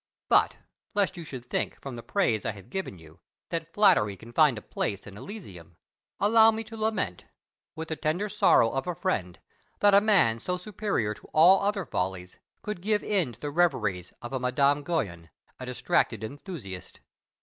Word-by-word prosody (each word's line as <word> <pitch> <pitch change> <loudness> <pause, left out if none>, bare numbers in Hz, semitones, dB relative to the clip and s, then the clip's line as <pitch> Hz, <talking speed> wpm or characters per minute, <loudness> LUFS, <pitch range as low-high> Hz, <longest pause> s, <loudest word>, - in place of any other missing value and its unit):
But - - +4 0.4
lest 200 -2 +1
you 170 - -7
should 130 -5 -8
think, - - -2
from 135 -3 -7
the 115 - -7
praise 120 - 0
I - - -2
have 100 -2 -14
given 190 - -4
you, 80 +1 -16 0.3
that 165 -1 -4
flattery 170 - +4
can 115 +5 -13
find 150 -4 +4
a - - -6
place 100 -1 -3
in 100 - -10
Elysium, 95 - -10 0.4
allow 220 +2 +6
me 225 0 -1
to 225 +1 -10
lament, 215 - -2 0.5
with 160 0 -6
the 160 - -2
tender 160 +7 -1
sorrow 115 - +4
of 135 +6 -3
a 180 - -2
friend, 95 - -2 0.4
that 205 -1 +5
a 200 - +7
man 180 - +3
so 180 +7 -2
superior 190 - -2
to - - -17
all 175 +5 +7
other 200 -2 0
follies 90 -4 -4 0.2
could 210 -4 -5
give 210 +2 +1
into 180 - -1
the 145 - -4
reveries 125 - +1
of 120 - -6
a 130 - -1
Madame 140 +3 +2
Guyon, 95 - -3 0.3
a 130 - -7
distracted 120 -3 0
enthusiast. 115 - -8
145 Hz, 180 wpm, -27 LUFS, -, 0.5 s, a